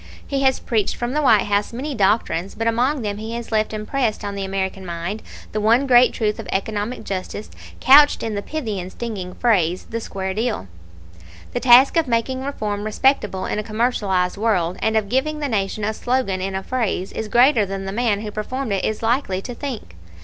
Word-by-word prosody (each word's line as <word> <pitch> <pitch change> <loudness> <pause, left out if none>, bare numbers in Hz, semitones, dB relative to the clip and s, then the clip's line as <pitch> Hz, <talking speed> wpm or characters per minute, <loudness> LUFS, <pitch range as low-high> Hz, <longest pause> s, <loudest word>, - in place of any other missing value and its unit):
He 275 -1 -2
has 265 -1 +3
preached 215 -4 0
from 240 0 -3
the 300 - +1
White 220 -8 +5
House 205 0 0
many 270 +5 -4
doctrines; 195 -4 +1
but 225 - -3
among 245 +4 +1
them 205 -1 -2
he 220 +1 -5
has 235 0 -6
left 215 -1 +1
impressed 215 0 -2
on 200 - -3
the 200 -1 -4
American 190 0 -3
mind 175 +4 -4 0.3
the 215 - -2
one 230 +6 +4
great 250 -1 +6
truth 210 -2 -1
of - - -7
economic 210 +4 -2
justice 195 +2 -5 0.3
couched 290 +3 +6
in 225 - -2
the 200 - -2
pithy 225 -8 -4
and 180 +1 -6
stinging 195 -6 -6
phrase 185 -7 +1
'the 230 - -2
square 190 -3 -4
deal.' 220 - -2 0.9
The - - 0
task 260 +5 +6
of 325 -3 +2
making 255 +2 -1
reform 210 -7 -3
respectable 215 -3 +1
in - - -2
a - - -2
commercialized 210 -5 0
world, 185 -5 +1
and 220 0 +2
of 215 -2 0
giving 265 +7 0
the 295 -1 -2
Nation 210 -3 -1
a 215 +1 0
slogan 240 -6 -1
in 190 0 -3
a 190 - -3
phrase, 225 -7 -2
is 220 - -4
greater 240 +1 +5
than 195 0 -4
the 195 - -3
man 215 -1 0
who 215 -1 -5
performed 225 +2 -3
it 195 - -1
is 215 +1 -2
likely 225 -5 +1
to 245 - -6
think. 235 - -6
220 Hz, 205 wpm, -21 LUFS, 195-245 Hz, 0.9 s, great